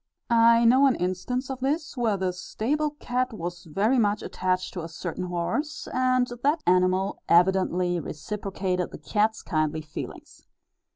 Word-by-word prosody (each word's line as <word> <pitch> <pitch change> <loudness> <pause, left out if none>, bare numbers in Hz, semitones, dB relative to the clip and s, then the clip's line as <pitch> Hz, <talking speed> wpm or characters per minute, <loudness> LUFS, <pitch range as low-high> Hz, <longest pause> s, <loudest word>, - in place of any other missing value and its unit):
I 230 0 +6
know 260 +4 +6
an 265 - +3
instance 185 +9 -2
of 260 - -5
this 290 +4 -1
where 230 -5 +1
the 185 -1 -1
stable 285 +11 -1
cat 250 +1 -1
was 175 -2 -6
very 205 - +1
much 210 -1 +1
attached 185 0 -2
to 180 - -4
a 165 - -6
certain 175 +2 -5
horse, 180 - -3
and 255 -1 +2 0.2
that 300 +3 +1
animal 185 +2 +2
evidently 180 0 +3
reciprocated 185 +2 -3
the - - -9
cat's 220 +1 0
kindly 155 -2 -1
feelings. 155 0 -9
195 Hz, 150 wpm, -26 LUFS, 180-250 Hz, 0.2 s, I